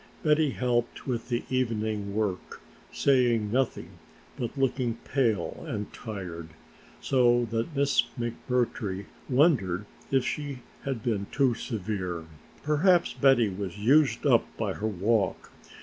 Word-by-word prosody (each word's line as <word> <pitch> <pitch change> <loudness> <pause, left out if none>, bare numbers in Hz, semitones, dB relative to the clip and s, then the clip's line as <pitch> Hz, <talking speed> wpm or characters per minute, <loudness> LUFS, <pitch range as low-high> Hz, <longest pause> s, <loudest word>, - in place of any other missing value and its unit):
Betty 155 -1 +3
helped 120 -2 -1
with 120 -2 -3
the 120 -1 -1
evening 110 -5 -1
work, 105 -4 -2 0.3
saying 120 -6 +2
nothing 130 +1 -1 0.4
but 120 +3 -4
looking 130 -3 0
pale 115 -10 0
and 105 0 -4
tired, 90 -7 -7 0.5
so 120 -2 +3
that 115 +7 -2
Miss 140 0 +3 0.2
McMurtry 120 -5 -2 0.2
wondered 125 - +3 0.2
if 135 -2 +2
she 140 -4 -4 0.2
had 130 -5 -3
been 100 -4 -1
too 135 -4 +3
severe. 95 -7 -4 0.4
Perhaps 170 +4 +3
Betty 135 -6 +4
was 95 -1 -5
used 135 +7 +3
up - - +4
by - - -1
her 110 - -3
walk! 105 0 0
120 Hz, 120 wpm, -28 LUFS, 105-135 Hz, 0.5 s, Betty